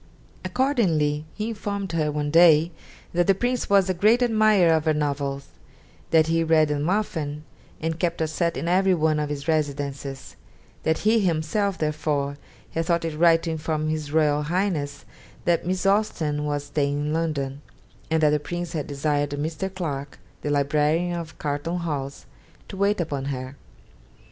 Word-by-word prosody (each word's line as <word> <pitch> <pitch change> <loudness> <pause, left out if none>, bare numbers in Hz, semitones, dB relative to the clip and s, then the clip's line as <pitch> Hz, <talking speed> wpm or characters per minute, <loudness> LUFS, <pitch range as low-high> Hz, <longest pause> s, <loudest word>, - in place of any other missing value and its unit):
Accordingly 170 - +1
he 215 +1 -3
informed 200 -3 -4
her 155 -2 0
one 145 0 -2
day 165 0 +6 0.4
that 175 0 +2
the 195 - +5
Prince 245 +4 -1
was 200 -2 +4
a 185 - +1
great 215 +7 +4
admirer 215 -7 +4
of 160 -1 +1
her 155 -1 +2
novels; 140 -2 -2 0.6
that 160 -1 +5
he 165 +1 +1
read 160 -1 +3
them 150 +2 -1
often, 155 -7 -2 0.4
and 160 +1 -3
kept 170 -2 -1
a 160 - +1
set 170 +2 -1
in 170 - -3
every 185 +1 +3
one 155 -2 +1
of 150 -1 -2
his 145 0 -5
residences; 140 -3 -2 0.5
that 160 0 +1
he 225 +1 +5
himself 190 +2 0
therefore 150 -2 -1 0.3
had 165 0 -2
thought 170 -1 +1
it 160 -2 -3
right 165 +1 +4
to 165 - -2
inform 155 -1 -2
his 155 -2 -3
Royal 150 -1 +3
Highness 150 -4 -2 0.4
that 170 0 +1
Miss 185 +1 -1
Austen 165 -8 +1
was 145 -1 -1
staying 145 0 -1
in 150 +1 -1
London, 145 -4 -2 0.5
and 160 -1 +1
that 150 - +5
the 150 - +2
Prince 175 +2 -5
had 155 -1 -3
desired 145 0 0
Mr. 155 +6 -3
Clarke, 145 -7 -5 0.2
the 150 - -3
librarian 150 +4 +1
of 160 -3 -9
Carlton 150 +4 -2
House, 145 -5 -4 0.4
to - - -7
wait 200 +1 +1
upon 145 -5 -2
her. 130 -1 -5
160 Hz, 170 wpm, -24 LUFS, 145-175 Hz, 0.6 s, day